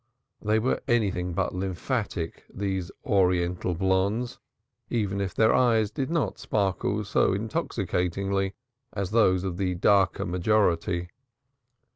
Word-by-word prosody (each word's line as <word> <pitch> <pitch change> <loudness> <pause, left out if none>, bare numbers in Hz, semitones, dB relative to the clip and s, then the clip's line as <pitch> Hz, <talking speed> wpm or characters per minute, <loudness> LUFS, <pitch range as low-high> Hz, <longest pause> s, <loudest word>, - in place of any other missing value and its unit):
They 105 +1 +2
were 120 +4 0
anything 95 -7 +1
but 95 +1 -1
lymphatic, 95 -1 -3
these 95 -3 -3 0.2
oriental 90 -2 +1
blondes, 100 +7 0 0.5
if 100 -4 -1
their 110 0 +4
eyes 115 -4 +3
did 130 +5 -3
not 165 -3 -1
sparkle 100 0 0
so 100 -2 +2
intoxicatingly 95 - -1 0.4
as 100 -2 -3
those 95 -5 +3
of 90 -3 -3
the 90 -2 0
darker 95 0 +3
majority. 90 -2 +1
95 Hz, 110 wpm, -27 LUFS, 90-110 Hz, 0.5 s, their